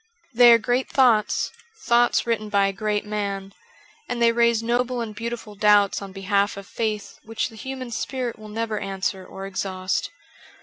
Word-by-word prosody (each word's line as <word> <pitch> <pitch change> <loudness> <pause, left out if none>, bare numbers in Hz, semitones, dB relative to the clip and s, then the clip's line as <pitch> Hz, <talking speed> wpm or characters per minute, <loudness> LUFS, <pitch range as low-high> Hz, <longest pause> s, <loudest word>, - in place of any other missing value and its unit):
They 240 0 +8
are 230 - +8
great 245 +3 -1
thoughts, 240 -6 +3 0.3
thoughts 240 0 +3
written 220 -2 -1
by 200 -1 +3
a 195 - 0
great 210 +1 -1
man, 200 -2 -4 0.6
and 245 - -2
they 235 0 +5
raise 235 -1 +2
noble 245 +1 0
and 225 -2 -4
beautiful 230 -1 -6
doubts 205 -1 +3
on 195 -1 -7
behalf 200 +1 0
of 200 - -8
faith 215 -1 -4
which 225 +2 -3
the 225 - -14
human 260 +1 -6
spirit 245 0 -3
will 215 0 -10
never 220 0 -2
answer 195 0 -3
or 195 +1 -8
exhaust. 190 -1 -2
215 Hz, 170 wpm, -24 LUFS, 200-235 Hz, 0.6 s, They